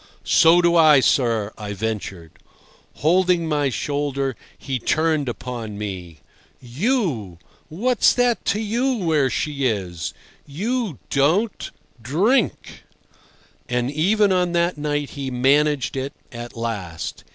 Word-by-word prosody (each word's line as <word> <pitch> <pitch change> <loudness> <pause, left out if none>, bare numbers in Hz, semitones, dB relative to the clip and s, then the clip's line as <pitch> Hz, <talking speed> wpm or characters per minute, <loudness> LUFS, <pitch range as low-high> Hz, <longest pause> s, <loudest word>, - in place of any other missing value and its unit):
"So 175 0 +5
do 170 0 +3
I, 155 -4 +7
sir," 115 -5 +1
I 105 -1 -5
ventured. 100 -5 -5 0.6
Holding 175 +1 +2
my 145 -3 +1
shoulder, 140 0 -2 0.2
he 135 -2 -4
turned 155 0 +1
upon 115 -4 -6
me. 90 -7 -6 0.4
"You! 130 - -1 0.3
What's 230 +9 +2
that 245 -4 +1
to 205 - +1
you 240 +5 0
where 160 - +1
she 140 0 -1
is? 90 -7 -3 0.3
You 205 - -2
don't—drink." 175 - 0 0.9
And 125 +1 0
even 200 +7 +2
on 180 -1 +1
that 170 +1 +1
night 145 -1 -2
he 140 -2 -5
"managed 135 +2 +2
it" 135 +2 -3 0.2
at 120 0 -8
last. 100 -8 -5
145 Hz, 115 wpm, -22 LUFS, 120-175 Hz, 0.9 s, I